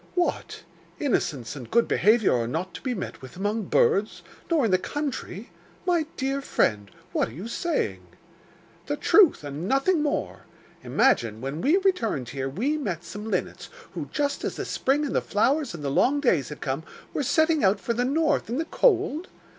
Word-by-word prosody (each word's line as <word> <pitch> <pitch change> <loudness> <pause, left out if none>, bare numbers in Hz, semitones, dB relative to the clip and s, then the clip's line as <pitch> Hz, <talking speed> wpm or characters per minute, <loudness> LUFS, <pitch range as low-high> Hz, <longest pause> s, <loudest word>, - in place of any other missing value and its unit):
'What! 355 -1 -1 0.4
innocence 145 - -1
and 130 -5 -9
good 235 0 +3
behaviour 215 0 +4
are 115 -1 0
not 165 +7 -3
to - - -8
be 255 -2 -2
met 190 - -6
with 130 +5 -11
among 205 +2 -1
birds, 205 +3 +2 0.3
nor 320 -7 +3
in 215 - +1
the 185 - +4
country! 265 -6 -5 0.3
My 340 -4 +2
dear 270 +1 -1
friend, 105 - 0 0.2
what - - 0
are - - -12
you 180 - -7
saying?' 335 +8 -2 0.8
'The - - -1
truth 380 - +5
and 145 +5 -5
nothing 275 - +2
more. 295 -1 -2 0.4
Imagine, 115 - +2
when 135 +6 -4
we 310 +7 +4
returned 240 - 0
here, 135 +1 -3
we 260 - -1
met 175 - -3
some 205 +6 -7
linnets - - -3 0.2
who, - - -6
just 285 -1 -1
as - - -2
the - - -4
spring 285 +3 +1
and 280 - -3
the - - +3
flowers 255 - +1
and 150 - -8
the 140 - -1
long 275 - +3
days 175 - +2
had 150 - -9
come, 135 +3 -2 0.3
were - - -1
setting 315 +3 +2
out 195 +1 +4
for 235 - -2
the 240 +2 0
north 295 -1 +1
and 245 +5 -1
the 325 - -1
cold? 370 - +2
235 Hz, 185 wpm, -26 LUFS, -, 0.8 s, truth